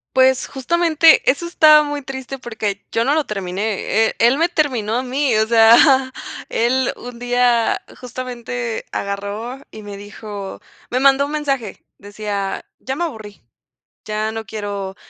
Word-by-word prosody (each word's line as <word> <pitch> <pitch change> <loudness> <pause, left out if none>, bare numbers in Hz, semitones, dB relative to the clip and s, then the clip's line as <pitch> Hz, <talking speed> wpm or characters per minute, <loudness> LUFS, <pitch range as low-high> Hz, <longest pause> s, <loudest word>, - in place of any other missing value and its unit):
Pues, 260 0 +4
justamente 330 +3 +3
eso 285 +6 0
está 305 -3 +6
muy 290 -1 -4
triste 270 0 -6
porque 215 -5 -4
yo 230 - +1
no 280 +5 +2
lo 310 -2 +1
terminé, 210 +2 -1
e - - -8
él 240 +4 +4
me 330 - +3
terminó 255 -10 0
a - - 0
mí, 260 -1 0
o 220 - +2
sea, 240 +4 +6 0.4
él 250 +2 +1
un 245 -1 -9
día 245 -1 +1 0.2
justamente 245 -2 -5
agarró 205 +6 -4
y 215 - -10
me 205 -1 -8
dijo 205 -1 -8 0.3
me 255 - +1
mandó 275 +1 +4
un 290 - -7
mensaje, 275 -8 -3
decía: 205 -1 -4
"Ya 265 - -5
me 345 +4 -1
aburrí, 220 -9 -9 0.6
ya 215 +1 -2
no 225 0 -5
quiero 200 -3 -5
240 Hz, 150 wpm, -19 LUFS, 215-270 Hz, 0.6 s, está